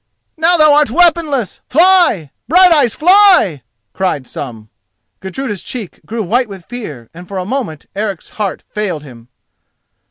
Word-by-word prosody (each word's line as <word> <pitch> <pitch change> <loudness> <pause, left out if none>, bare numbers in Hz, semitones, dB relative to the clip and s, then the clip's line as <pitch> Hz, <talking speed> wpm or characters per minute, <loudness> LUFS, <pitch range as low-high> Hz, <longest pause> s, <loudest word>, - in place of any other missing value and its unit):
"Now 335 +2 +3
thou 305 -2 +5
art 295 -2 +3
weaponless, 310 - +1
fly! 335 - +3 0.2
Brighteyes; 320 - +4
fly!" 360 - +4 0.3
cried 185 -8 -2
some. 115 -5 -8 0.5
Gudruda's 205 +1 -5
cheek 225 -8 -8
grew 225 0 -3
white 235 +5 0
with 190 -4 -10
fear, 155 - -8
and 175 +2 -12
for 195 - -6
a 185 - -3
moment 210 - -4
Eric's 200 -3 -4
heart 205 -3 -4
failed 195 -8 -3
him. 120 -5 -14
215 Hz, 135 wpm, -15 LUFS, -, 0.5 s, thou